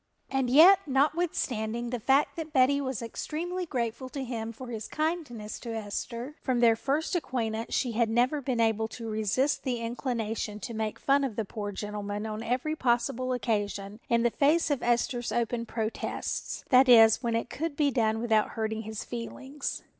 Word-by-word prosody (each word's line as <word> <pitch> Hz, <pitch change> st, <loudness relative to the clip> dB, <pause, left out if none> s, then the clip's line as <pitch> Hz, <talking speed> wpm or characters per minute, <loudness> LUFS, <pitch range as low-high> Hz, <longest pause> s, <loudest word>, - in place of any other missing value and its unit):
And 265 Hz, -2 st, +1 dB
yet 340 Hz, +9 st, +8 dB
notwithstanding 260 Hz, -6 st, 0 dB
the 245 Hz, -, -2 dB
fact 270 Hz, +6 st, +2 dB
that 320 Hz, -2 st, -5 dB
Betty 280 Hz, 0 st, +4 dB
was 260 Hz, -4 st, -3 dB
extremely 345 Hz, +9 st, -4 dB
grateful 250 Hz, -1 st, -3 dB
to 275 Hz, 0 st, -4 dB
him 230 Hz, -3 st, -4 dB
for 245 Hz, +2 st, -9 dB
his 220 Hz, -2 st, -5 dB
kindness 305 Hz, -10 st, -3 dB
to 230 Hz, -2 st, -5 dB
Esther, 235 Hz, +5 st, -4 dB
from 255 Hz, -3 st, 0 dB
their 230 Hz, -1 st, +5 dB
first 280 Hz, +9 st, -1 dB
acquaintance 230 Hz, -8 st, -2 dB
she 245 Hz, -, 0 dB
had 230 Hz, 0 st, +1 dB
never 250 Hz, +6 st, +2 dB
been 255 Hz, -3 st, -1 dB
able 225 Hz, -1 st, +2 dB
to 225 Hz, +1 st, -8 dB
resist 220 Hz, +6 st, 0 dB
the 255 Hz, -3 st, -1 dB
inclination 230 Hz, -3 st, -3 dB
to 235 Hz, -, -5 dB
make 220 Hz, -1 st, -2 dB
fun 280 Hz, +1 st, +2 dB
of 255 Hz, -6 st, -2 dB
the 225 Hz, -, -2 dB
poor 205 Hz, 0 st, -5 dB
gentleman 205 Hz, +1 st, -4 dB
on 215 Hz, 0 st, -4 dB
every 255 Hz, +7 st, -1 dB
possible 245 Hz, -1 st, 0 dB
occasion, 205 Hz, -4 st, -2 dB
in 235 Hz, -1 st, +3 dB
the 240 Hz, -, +3 dB
face 300 Hz, +5 st, +2 dB
of 280 Hz, -, 0 dB
Esther's 240 Hz, 0 st, 0 dB
open 235 Hz, 0 st, -1 dB
protests, 225 Hz, -1 st, -3 dB
that 260 Hz, 0 st, +6 dB
is, 225 Hz, -2 st, +8 dB
when 235 Hz, -2 st, 0 dB
it 230 Hz, +1 st, -2 dB
could 320 Hz, 0 st, -3 dB
be 290 Hz, -1 st, +2 dB
done 225 Hz, -3 st, +1 dB
without 220 Hz, -2 st, +2 dB
hurting 220 Hz, 0 st, -1 dB
his 220 Hz, -1 st, -6 dB
feelings. 265 Hz, +4 st, -5 dB
240 Hz, 175 wpm, -28 LUFS, 220-270 Hz, -, yet